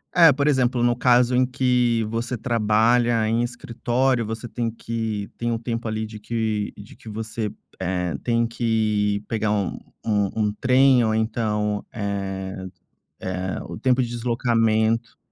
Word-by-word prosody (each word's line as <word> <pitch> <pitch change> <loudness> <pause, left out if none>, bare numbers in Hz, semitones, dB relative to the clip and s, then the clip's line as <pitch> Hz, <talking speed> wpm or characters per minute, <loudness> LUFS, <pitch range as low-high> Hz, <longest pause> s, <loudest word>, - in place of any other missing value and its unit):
É, 165 -4 +8
por 140 +2 0
exemplo, 130 -4 +2
no 120 0 +3
caso 125 0 +4
em 130 0 +4
que 125 -3 +1
você 115 +2 -2
trabalha 115 0 +2
em 115 +2 +1
escritório, 120 +1 0
você 115 +2 -5
tem 115 +1 -2
que 110 -3 -4
tem 120 0 -1
um 115 - 0
tempo 115 -1 -3
ali 110 0 -2
de 110 -1 -9
que 110 -1 -2
de 100 0 -12
que 110 - -12
você, 110 0 -4 0.3
eh, 90 -1 -1
tem 115 -1 +1
que 110 -3 0
pegar 110 -2 0
um 100 -4 -1 0.3
um 105 0 +1
trem. 130 -1 +5
Ou 110 -1 +1
então, 105 -2 -1
eh 95 -2 -4 0.6
eh, 95 -1 -3
o - - -6
tempo 130 0 +2
de 120 - -2
deslocamento 115 -1 +1
115 Hz, 150 wpm, -23 LUFS, 105-120 Hz, 0.6 s, É